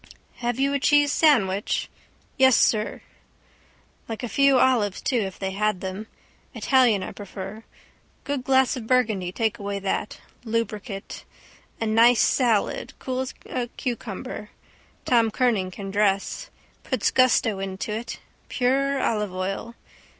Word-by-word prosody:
—Have 240 +1 -2
you 275 +1 +2
a 280 - +1
cheese 290 +1 +4
sandwich? 210 - +2 0.5
—Yes, 260 -2 +5
sir. 215 -1 +1 1.1
Like 225 +2 -5
a - - -1
few 275 +4 +4
olives 235 -7 +2
too 250 - 0
if 195 -3 -3
they 190 -1 -3
had 210 0 0
them. 190 +3 -6 0.5
Italian 245 -7 +3
I - - -5
prefer. 200 +1 -8 0.6
Good 280 -3 -3
glass 265 0 +3
of 235 -4 -7
burgundy 215 -8 +1
take 225 +3 -1
away 200 0 -3
that. 195 +1 -3 0.2
Lubricate. 220 -3 -4 0.6
A 225 - -1
nice 230 +2 +5
salad, 235 -6 +1
cool 255 -1 -4
as 260 0 -4
a 245 -2 -3
cucumber, 235 -3 -5 0.6
Tom 230 -2 +3
Kernan 220 -5 +1
can 195 +1 -7
dress. 200 -1 0 0.3
Puts - - 0
gusto 245 -5 +3
into 195 +2 -4
it. 225 +2 -5 0.3
Pure 270 +2 +1
olive 210 -3 0
oil. 195 +5 -4
225 Hz, 135 wpm, -24 LUFS, 200-255 Hz, 1.1 s, Yes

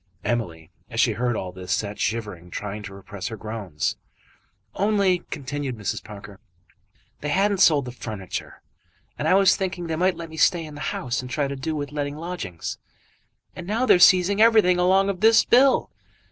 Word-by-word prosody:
Emily 85 -10 -3 0.2
as - - -4
she - - +4
heard 120 0 -1
all 95 -3 -4
this 90 0 -8
sat 105 +2 -2
shivering, 105 -6 -3
trying 105 +4 -5
to 105 -2 -9
repress 95 -1 -7
her 110 - -6
groans. 105 -8 -4 0.8
"Only," 200 -3 +2
continued 140 -2 -4
Mrs. 105 -3 -3
Parker, 100 -1 -11 0.8
"they 150 - -4
hadn't 195 +4 +1
sold 150 -7 +5
the 125 - -6
furniture, 105 -6 -7 0.6
and - - -1
I 185 - +5
was 195 -1 +5
thinking 185 -2 -3
they 165 -1 -2
might 185 +3 +1
let 165 -1 -8
me 160 - -9
stay 165 +1 +3
in 155 - -10
the 145 - -9
house, 125 +1 -3
and 125 - -9
try 140 +2 -1
to 140 - -4
do 155 +4 -3
with 145 -1 -4
letting 145 0 -3
lodgings, 155 - -6 0.8
and 180 -1 -8
now 225 +5 0
they're 180 - +5
seizing 185 +3 +5
everything 215 -6 +5
along 190 +2 +3
of 195 -2 -2
this 225 +1 +6
bill. 260 +2 +4
145 Hz, 185 wpm, -24 LUFS, -, 0.8 s, this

